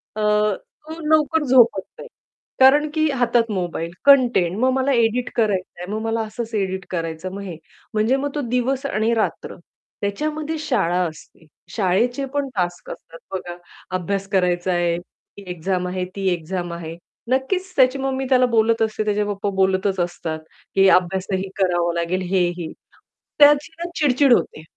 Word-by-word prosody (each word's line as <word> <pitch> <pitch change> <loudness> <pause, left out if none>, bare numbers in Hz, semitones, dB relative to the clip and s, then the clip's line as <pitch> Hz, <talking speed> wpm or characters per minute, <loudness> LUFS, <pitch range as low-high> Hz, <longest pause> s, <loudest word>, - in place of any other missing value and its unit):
अ, 215 - -3
तो 210 - -1
लवकर 315 0 +3
झोपत 245 -6 +5 0.2
नाही. - - -8 0.5
कारण 290 +3 +6
की 315 -1 +2
हातात 240 -3 +1
मोबाईल 175 -3 -3
कंटेंट 245 -10 +5
मग 255 +2 +3
मला 265 +1 +1
एडिट 240 0 +1
करायचं 195 -6 -1
आहे, - - -4
मग 215 - -2
मला 225 0 -1
असच 225 +1 -6
एडिट 190 -2 -2
करायचंय 165 +1 -4
मग 200 - -6
हे. 185 -5 -7 0.4
म्हणजे 215 +4 +2
मग 285 +1 -2
तो 295 - -1
दिवस 255 +3 0
आणि 225 -2 0
रात्र 225 -2 -2 0.5
त्याच्यामध्ये 305 +10 -2
शाळा 195 - 0
असते, 160 +1 -13 0.3
शाळेचे 230 +7 +1
पण 285 -1 0
टास्क 175 -2 -2
असतात 165 0 -11
बघा, 175 -2 -5 0.4
अभ्यास 195 +2 -2
करायचा 180 -2 +1
आहे, 175 -1 +1
ती 180 +3 -15
एक्झाम 180 +1 -2
आहे 180 0 -3
ती 195 -1 -2
एक्झाम 175 +1 -4
आहे 165 -1 -7 0.4
नक्कीच 365 +9 -1
त्याची 260 0 +4
मम्मी 265 0 -2
त्याला 255 -1 +5
बोलत 225 0 +2
असते, 215 -1 0
त्याचे 210 0 +1
पप्पा 205 0 -2
बोलतच 190 0 +1
असतात, 175 -2 -3 0.4
की 195 0 +5
अभ्यासही 190 +1 +1
करावा 175 -3 +1
लागेल, 170 +2 -1
हेही. 175 -3 0 0.7
त्याची 295 +1 +6
ना 345 +1 -4
चिड-चिड 280 -3 +4
होते. 155 - 0
205 Hz, 155 wpm, -21 LUFS, 180-255 Hz, 0.7 s, कारण